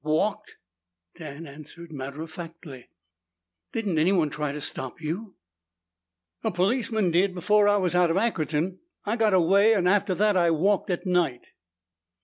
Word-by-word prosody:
"Walked," 200 Hz, +8 st, -1 dB, 0.6 s
Dan 155 Hz, 0 st, -9 dB
answered 155 Hz, +3 st, -11 dB
matter 140 Hz, +1 st, -6 dB
of 165 Hz, -, -10 dB
factly. 160 Hz, -6 st, -10 dB, 0.8 s
"Didn't 200 Hz, -8 st, -1 dB
anyone 165 Hz, -2 st, +2 dB
try 150 Hz, 0 st, -3 dB
to 150 Hz, -, -6 dB
stop 130 Hz, -1 st, -3 dB
you?" 180 Hz, +6 st, -5 dB, 1.1 s
"A -, -, +1 dB
policeman 210 Hz, +1 st, 0 dB
did 185 Hz, +2 st, +2 dB
before 205 Hz, +3 st, +3 dB
I 205 Hz, 0 st, +4 dB
was 185 Hz, -3 st, 0 dB
out 180 Hz, -1 st, +3 dB
of 165 Hz, -, +1 dB
Ackerton. 175 Hz, -4 st, -1 dB, 0.3 s
I 210 Hz, +2 st, 0 dB
got 220 Hz, -4 st, +2 dB
away, 195 Hz, +5 st, +4 dB
and 180 Hz, -3 st, +1 dB
after 200 Hz, 0 st, +2 dB
that 210 Hz, +2 st, +2 dB
I 175 Hz, -2 st, +3 dB
walked 195 Hz, +6 st, +1 dB
at 180 Hz, +2 st, -2 dB
night." 175 Hz, -9 st, 0 dB
180 Hz, 150 wpm, -26 LUFS, 155-205 Hz, 1.1 s, I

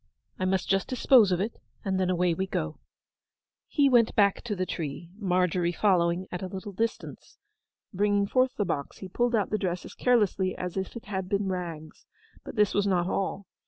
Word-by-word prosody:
'I 185 Hz, -, 0 dB
must 185 Hz, -1 st, 0 dB
just 195 Hz, -1 st, +1 dB
dispose 250 Hz, -5 st, +5 dB
of 180 Hz, -, +1 dB
it; 215 Hz, +4 st, -3 dB, 0.3 s
and 190 Hz, -1 st, 0 dB
then 185 Hz, -1 st, +1 dB
away 180 Hz, -1 st, +2 dB
we 190 Hz, +3 st, -2 dB
go.' -, -, -3 dB, 0.9 s
He 285 Hz, -2 st, +3 dB
went 240 Hz, -4 st, +4 dB
back 200 Hz, -2 st, +3 dB
to 215 Hz, -3 st, -2 dB
the 185 Hz, -1 st, -1 dB
tree, 165 Hz, 0 st, -5 dB
Margery 180 Hz, -3 st, +1 dB
following 175 Hz, -1 st, +2 dB
at 180 Hz, -, -4 dB
a 190 Hz, -, -3 dB
little 190 Hz, +2 st, -7 dB
distance. 225 Hz, +4 st, -4 dB, 0.6 s
Bringing 205 Hz, +1 st, +2 dB
forth 255 Hz, +4 st, +1 dB
the 205 Hz, -, 0 dB
box, 140 Hz, -5 st, -3 dB
he 190 Hz, -, -8 dB
pulled 240 Hz, +5 st, 0 dB
out 205 Hz, -4 st, 0 dB
the 215 Hz, -, 0 dB
dress 180 Hz, -2 st, -2 dB
as -, -, -10 dB
carelessly 205 Hz, -6 st, +2 dB
as 180 Hz, -1 st, -4 dB
if 190 Hz, +3 st, -4 dB
it 235 Hz, -, -8 dB
had 190 Hz, -3 st, -4 dB
been 200 Hz, -1 st, 0 dB
rags. 165 Hz, -4 st, -6 dB, 0.4 s
But -, -, -9 dB
this 210 Hz, -2 st, +3 dB
was 205 Hz, 0 st, +1 dB
not 180 Hz, -3 st, +2 dB
all. 195 Hz, +1 st, -2 dB
190 Hz, 195 wpm, -28 LUFS, 180-210 Hz, 0.9 s, dispose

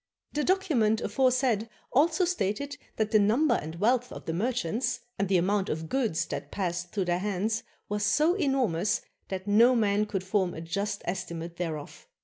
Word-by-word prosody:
The 295 Hz, -, 0 dB
document 290 Hz, -, +2 dB
aforesaid 255 Hz, -4 st, +1 dB, 0.2 s
also 320 Hz, +6 st, +3 dB
stated 285 Hz, -, -1 dB, 0.2 s
that 220 Hz, -1 st, 0 dB
the 215 Hz, -, +5 dB
number 235 Hz, +7 st, +3 dB
and 160 Hz, -6 st, -3 dB
wealth 245 Hz, +7 st, +1 dB
of -, -, -9 dB
the 165 Hz, -, -2 dB
merchants, 240 Hz, +4 st, -1 dB, 0.2 s
and 195 Hz, -1 st, 0 dB
the 190 Hz, -, +4 dB
amount 195 Hz, +3 st, +1 dB
of 160 Hz, +1 st, -3 dB
goods 215 Hz, -11 st, 0 dB
that -, -, -5 dB
passed 175 Hz, -2 st, -2 dB
through 195 Hz, -3 st, -1 dB
their 175 Hz, 0 st, +1 dB
hands, 210 Hz, +3 st, -1 dB, 0.3 s
was 210 Hz, 0 st, -2 dB
so 300 Hz, +11 st, +3 dB
enormous 260 Hz, -, +1 dB, 0.3 s
that 190 Hz, -1 st, -4 dB
no 230 Hz, +5 st, +5 dB
man 210 Hz, -2 st, +2 dB
could 195 Hz, -3 st, -2 dB
form 190 Hz, -2 st, 0 dB
a 160 Hz, -, -6 dB
just 200 Hz, +5 st, -3 dB
estimate 170 Hz, -2 st, -4 dB
thereof. 160 Hz, -4 st, -5 dB
210 Hz, 170 wpm, -28 LUFS, 180-255 Hz, 0.3 s, the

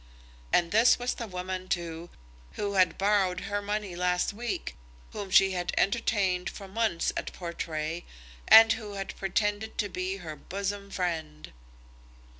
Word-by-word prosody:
And 170 Hz, -1 st, +3 dB
this 225 Hz, +3 st, +5 dB
was 245 Hz, 0 st, -1 dB
the 230 Hz, -, -6 dB
woman, 185 Hz, 0 st, -5 dB
too, 170 Hz, -1 st, -3 dB, 0.4 s
who 200 Hz, -1 st, -3 dB
had 185 Hz, -3 st, +3 dB
borrowed 195 Hz, -2 st, +2 dB
her 205 Hz, 0 st, -2 dB
money 205 Hz, -2 st, -3 dB
last 180 Hz, +1 st, 0 dB
week, 235 Hz, +2 st, -4 dB, 0.4 s
whom 200 Hz, -2 st, -5 dB
she 195 Hz, +1 st, +6 dB
had 175 Hz, -1 st, -2 dB
entertained 195 Hz, -4 st, +1 dB
for 195 Hz, -, -9 dB
months 200 Hz, -4 st, 0 dB
at -, -, -3 dB
Portray, 165 Hz, -1 st, -4 dB, 0.4 s
and 225 Hz, 0 st, +9 dB
who 210 Hz, -3 st, -7 dB
had 195 Hz, -1 st, -5 dB
pretended 205 Hz, +2 st, -1 dB
to 205 Hz, -, 0 dB
be 185 Hz, +1 st, -3 dB
her 160 Hz, -5 st, -7 dB
bosom 200 Hz, +5 st, -4 dB
friend. 160 Hz, -, -4 dB
190 Hz, 145 wpm, -28 LUFS, 175-205 Hz, 0.4 s, and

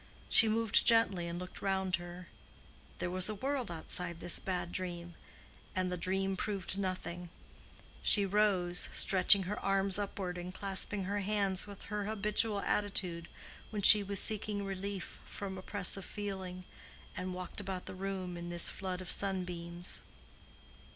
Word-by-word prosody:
She 225 Hz, -, +7 dB
moved 220 Hz, -1 st, +3 dB
gently 205 Hz, -7 st, +3 dB
and 170 Hz, 0 st, -5 dB
looked 180 Hz, 0 st, -8 dB
round 190 Hz, -2 st, 0 dB
her—there 175 Hz, 0 st, -11 dB
was 185 Hz, +2 st, +3 dB
a 215 Hz, -, -3 dB
world 265 Hz, +2 st, -3 dB
outside 170 Hz, +1 st, -2 dB
this 175 Hz, -, +1 dB
bad 180 Hz, -2 st, -3 dB
dream, 175 Hz, -2 st, -5 dB, 0.6 s
and 185 Hz, -1 st, -1 dB
the -, -, -1 dB
dream 190 Hz, +2 st, -1 dB
proved 195 Hz, -1 st, -2 dB
nothing; 185 Hz, -2 st, -4 dB, 0.7 s
she 205 Hz, -2 st, +4 dB
rose, 190 Hz, -3 st, +1 dB
stretching 190 Hz, 0 st, +6 dB
her 195 Hz, +3 st, -4 dB
arms 195 Hz, 0 st, +3 dB
upward 190 Hz, -3 st, -4 dB
and 180 Hz, +1 st, -6 dB
clasping 195 Hz, +1 st, +2 dB
her 200 Hz, +2 st, -2 dB
hands 200 Hz, -1 st, 0 dB
with 200 Hz, -1 st, -11 dB
her 210 Hz, 0 st, -4 dB
habitual 210 Hz, 0 st, 0 dB
attitude 180 Hz, -5 st, -2 dB, 0.4 s
when 210 Hz, -2 st, -4 dB
she 210 Hz, +1 st, +10 dB
was 200 Hz, -1 st, -2 dB
seeking 210 Hz, -2 st, +1 dB
relief 195 Hz, -1 st, -6 dB
from 195 Hz, -2 st, -7 dB
oppressive 195 Hz, 0 st, +1 dB
feeling, 190 Hz, -3 st, -6 dB, 0.5 s
and 185 Hz, 0 st, -5 dB
walked 180 Hz, +2 st, -5 dB
about 190 Hz, -2 st, -5 dB
the -, -, -7 dB
room 185 Hz, -1 st, -5 dB
in 170 Hz, 0 st, -7 dB
this 175 Hz, 0 st, +4 dB
flood 185 Hz, -1 st, -5 dB
of 185 Hz, -, -4 dB
sunbeams. 175 Hz, -3 st, -2 dB
190 Hz, 145 wpm, -33 LUFS, 180-200 Hz, 0.7 s, she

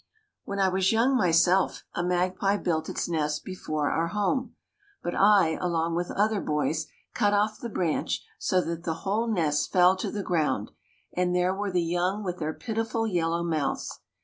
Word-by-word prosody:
When 200 Hz, -, -4 dB
I 195 Hz, -1 st, +3 dB
was 190 Hz, 0 st, +2 dB
young 235 Hz, +4 st, +3 dB
myself 180 Hz, -2 st, +3 dB
a -, -, -1 dB
magpie 185 Hz, +3 st, +1 dB
built 160 Hz, -5 st, -1 dB
its -, -, -2 dB
nest 150 Hz, -3 st, -1 dB
before 155 Hz, -6 st, -2 dB
our 165 Hz, +1 st, 0 dB
home, 210 Hz, +7 st, -1 dB, 0.5 s
but 175 Hz, -, -2 dB
I, 195 Hz, -6 st, +4 dB
along 170 Hz, -2 st, 0 dB
with 175 Hz, +1 st, -1 dB
other 210 Hz, 0 st, +1 dB
boys, 150 Hz, +1 st, -1 dB, 0.3 s
cut 205 Hz, -3 st, +2 dB
off 215 Hz, +1 st, +1 dB
the 235 Hz, -, -5 dB
branch 175 Hz, -6 st, -1 dB
so 185 Hz, -1 st, +2 dB
that 170 Hz, -1 st, -4 dB
the 165 Hz, -2 st, -2 dB
whole 215 Hz, +4 st, 0 dB
nest 155 Hz, -7 st, 0 dB
fell 180 Hz, 0 st, +5 dB
to -, -, -3 dB
the 205 Hz, -2 st, -4 dB
ground, 160 Hz, -5 st, 0 dB, 0.4 s
and 180 Hz, 0 st, 0 dB
there 180 Hz, +1 st, +2 dB
were 200 Hz, +1 st, -2 dB
the 180 Hz, -1 st, +1 dB
young 180 Hz, +5 st, -1 dB
with 180 Hz, -2 st, -4 dB
their 155 Hz, -1 st, -1 dB
pitiful 225 Hz, +3 st, -2 dB
yellow 170 Hz, -4 st, 0 dB
mouths. 155 Hz, -5 st, -2 dB
180 Hz, 175 wpm, -27 LUFS, 165-205 Hz, 0.5 s, fell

